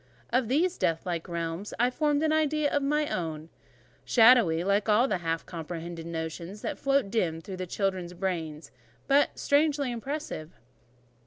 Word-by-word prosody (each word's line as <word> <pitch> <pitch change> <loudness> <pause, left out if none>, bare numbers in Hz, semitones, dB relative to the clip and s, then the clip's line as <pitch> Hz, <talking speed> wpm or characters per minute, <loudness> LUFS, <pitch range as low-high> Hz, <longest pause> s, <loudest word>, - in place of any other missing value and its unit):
Of 250 -1 +2
these 335 +9 +1
death 165 -1 0
white 170 -1 -3
realms 170 +3 -4
I 245 +1 +3
formed 295 +2 +1
an 310 -1 +2
idea 305 -1 +1
of 290 - +2
my 300 +2 +1
own: 160 -2 -4 0.5
shadowy, 225 -9 +5
like 200 +3 +1
all 220 +5 +5
the 190 -8 -1
half 165 -1 -2
comprehended 165 0 -6
notions 170 +4 -5
that - - -3
float 275 -7 +1
dim 175 -8 0
through 185 +2 -6
children's 185 -2 -2
brains, 165 -4 -4 0.3
but 280 +1 +3
strangely 285 -2 +2
impressive. 240 - -5
195 Hz, 150 wpm, -28 LUFS, 165-275 Hz, 0.5 s, shadowy